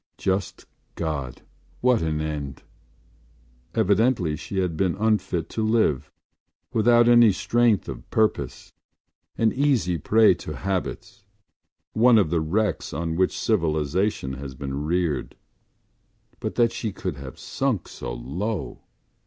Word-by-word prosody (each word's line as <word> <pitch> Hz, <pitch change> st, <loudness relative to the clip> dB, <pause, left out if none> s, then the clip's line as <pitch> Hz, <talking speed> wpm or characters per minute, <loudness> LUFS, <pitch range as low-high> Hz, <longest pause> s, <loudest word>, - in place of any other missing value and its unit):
Just 95 Hz, -1 st, -2 dB, 0.3 s
God, 75 Hz, -7 st, -4 dB, 0.4 s
what 125 Hz, -2 st, +3 dB
an 80 Hz, -1 st, -1 dB
end! 75 Hz, -3 st, -5 dB, 1.1 s
Evidently 105 Hz, -5 st, +2 dB
she 95 Hz, -, -6 dB
had 90 Hz, -3 st, 0 dB
been 95 Hz, 0 st, +1 dB
unfit 105 Hz, -6 st, 0 dB
to 110 Hz, -, -2 dB
live, 110 Hz, -, +1 dB, 0.6 s
without 120 Hz, +1 st, +5 dB
any 120 Hz, -2 st, +7 dB
strength 115 Hz, +2 st, +2 dB
of -, -, -8 dB
purpose, 110 Hz, -1 st, -1 dB, 0.6 s
an 115 Hz, -1 st, +2 dB
easy 125 Hz, -, +1 dB
prey 110 Hz, +6 st, +5 dB
to 75 Hz, -2 st, -7 dB
habits, 95 Hz, +5 st, -4 dB, 0.7 s
one 120 Hz, +1 st, +5 dB
of 95 Hz, -7 st, +2 dB
the 85 Hz, -2 st, +2 dB
wrecks 95 Hz, +5 st, -1 dB
on 80 Hz, -1 st, -2 dB
which 95 Hz, +2 st, +1 dB
civilisation 80 Hz, -4 st, 0 dB
has 65 Hz, 0 st, -7 dB
been 70 Hz, +2 st, -4 dB
reared. 80 Hz, -5 st, -1 dB, 1.0 s
But -, -, -4 dB
that 115 Hz, -1 st, +3 dB
she 110 Hz, -, -3 dB
could -, -, -5 dB
have 65 Hz, -1 st, -9 dB
sunk 130 Hz, -9 st, -2 dB
so -, -, -7 dB
low! 75 Hz, -, -4 dB
95 Hz, 125 wpm, -24 LUFS, 75-110 Hz, 1.1 s, any